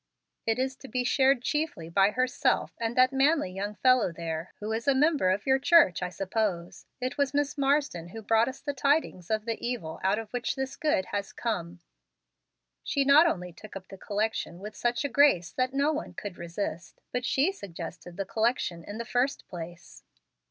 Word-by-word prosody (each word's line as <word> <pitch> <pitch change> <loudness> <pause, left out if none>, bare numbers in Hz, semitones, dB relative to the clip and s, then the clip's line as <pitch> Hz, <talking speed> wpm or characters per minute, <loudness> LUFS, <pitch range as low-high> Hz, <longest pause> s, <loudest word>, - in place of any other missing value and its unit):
It 225 0 +2
is 260 +1 -1
to 270 - -11
be 250 -1 -1
shared 265 0 +3
chiefly 295 - -2
by 195 +4 +4
herself 255 +3 +1
and 230 0 -2
that 255 +1 +5
manly 275 - +3
young 200 +3 -4
fellow 255 -1 +4
there, 165 0 -5
who 210 +1 -4
is 225 +3 -3
a 275 - +4
member 290 - +3
of 195 +3 0
your 265 0 +3
church, 280 - +5
I 180 - -1
suppose. 185 -2 -3
It 255 +3 -3
was 280 0 +1
Miss 290 0 +1
Marsden 275 - +1
who 220 +5 -9
brought 225 +2 +3
us 260 +1 -6
the 285 0 -3
tidings 275 - 0
of 215 -1 0
the 230 -1 -3
evil 230 -10 -3
out 195 +2 +2
of 225 -1 -6
which 245 -1 -1
this 265 0 -3
good 300 - +1
has 200 -1 -2
come. 175 -7 -4 1.0
She 280 -1 0
not 295 +5 +7
only 180 - -2
took 210 +4 -12
up 190 -1 -9
the - - -9
collection 210 -4 -2
with 210 +3 -8
such 240 +4 0
a - - +2
grace 260 - +4
that 255 0 0
no 280 +3 +2
one 310 - -5
could 200 -3 -7
resist, 170 0 -5
but 250 0 -2
she 275 +8 +2
suggested 175 - -9
the 195 - -2
collection 220 -6 0
in 205 +5 -7
the 235 - -4
first 250 +4 0
place." 175 -1 -9
225 Hz, 195 wpm, -28 LUFS, 185-270 Hz, 1.0 s, not